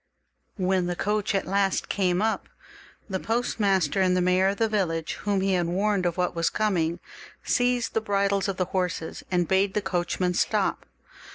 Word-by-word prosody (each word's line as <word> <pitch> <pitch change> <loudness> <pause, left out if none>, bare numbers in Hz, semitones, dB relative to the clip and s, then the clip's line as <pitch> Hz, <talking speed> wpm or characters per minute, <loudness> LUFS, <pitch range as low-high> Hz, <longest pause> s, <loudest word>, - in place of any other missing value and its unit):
When 185 -1 +1
the 175 - -2
coach 210 +2 -1
at 195 - 0
last 195 0 0
came 185 0 +1
up, 220 0 -1 0.6
the 190 -3 -2
postmaster 195 -7 +1
and 185 -1 +3
the - - +2
mayor 180 +1 +3
of 200 +1 0
the 225 - +2
village, 175 -7 -1
whom 200 -2 +1
he 195 0 +1
had 175 -2 +1
warned 190 +1 +1
of 170 - -3
what 180 -1 0
was 165 0 +1
coming, 175 -6 0 0.4
seized 245 -1 +1
the 225 - +1
bridles 200 -2 +1
of 195 -2 -3
the 185 - +1
horses, 180 -3 -3
and 175 -2 +1
bade 190 +1 +2
the - - +3
coachman 180 -1 -1
stop. - - 0
190 Hz, 180 wpm, -26 LUFS, 180-200 Hz, 0.6 s, and